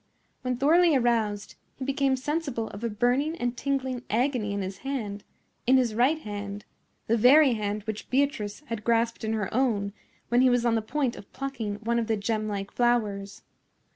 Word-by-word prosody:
When 250 -1 -2
thoroughly 325 +4 +5
aroused, 225 -5 0 0.2
he 265 - -6
became 275 -1 +1
sensible 275 -4 -2
of 200 +3 -9
a 235 - 0
burning 250 +9 +1
and 245 -3 -2
tingling 260 -1 -2
agony 240 -2 0
in 200 -1 -2
his 190 +1 -6
hand—in 250 0 -2
his 245 -4 +1
right 255 +8 +3
hand—the 205 0 -5
very 265 +4 +6
hand 210 -1 -2
which 215 0 -6
Beatrice 255 -5 0
had 230 -7 -6
grasped 230 0 +1
in 220 0 -1
her 210 -4 -2
own 215 -5 +1 0.4
when 240 +1 +4
he 260 - +6
was 245 -1 +2
on 235 - +3
the 225 - +2
point 250 +2 -1
of 200 - -12
plucking 255 -6 -4
one 235 +1 +1
of 230 - -2
the 220 -1 +1
gemlike 205 -1 -2
flowers. 210 -5 0
235 Hz, 170 wpm, -27 LUFS, 210-265 Hz, 0.4 s, very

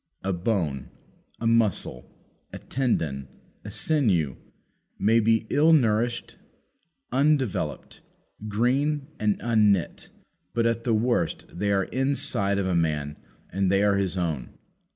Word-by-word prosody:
A 95 0 -1
bone, 85 - -2 0.5
a 115 - -4
muscle, 115 -4 +1 0.4
a - - -7
tendon, 80 - -2 0.4
a - - -7
sinew, 95 - +1 0.6
may 115 +3 +3
be 115 0 +2
ill 160 +3 +5
nourished, 120 -3 +1 0.7
undeveloped, 135 -3 0 0.5
green, 135 +7 +1
and 105 -1 +1
unknit, 105 -6 +1 0.5
but, 115 -1 +2
at 115 0 0
the 115 -3 +2
worst, 110 -7 0
they 100 +3 0
are 100 -1 +2
inside 130 -6 0
of 100 - 0
a 95 - 0
man 75 -3 0 0.4
and 95 0 +1
they 100 +1 +3
are 100 -1 +3
his 95 -1 -1
own. 80 -7 -3
105 Hz, 125 wpm, -26 LUFS, 90-120 Hz, 0.7 s, ill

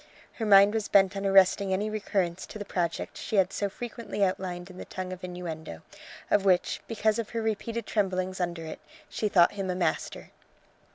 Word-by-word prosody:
Her 220 - -1
mind 200 0 +7
was 220 -2 -1
bent 195 -1 +4
on 195 0 -1
arresting 195 0 +4
any 195 +3 0
recurrence 195 -4 -2
to - - -8
the 205 - -6
project 170 -3 -3
she - - -4
had 190 -2 +3
so 200 - -1
frequently 230 -1 -4
outlined 185 -1 -2
in 185 - -12
the - - -7
tongue 185 0 -5
of 185 - -10
innuendo, 165 - -6 0.5
of 205 - +4
which, 185 -2 +2
because 220 0 +1
of 225 - -3
her 230 - -3
repeated 225 +1 -2
tremblings 185 -2 -1
under 170 -2 -3
it, 160 - -7 0.3
she 215 - -1
thought 175 -3 +5
him 195 -2 -4
a 180 - -1
master. 170 -3 -2
195 Hz, 190 wpm, -28 LUFS, 180-210 Hz, 0.5 s, mind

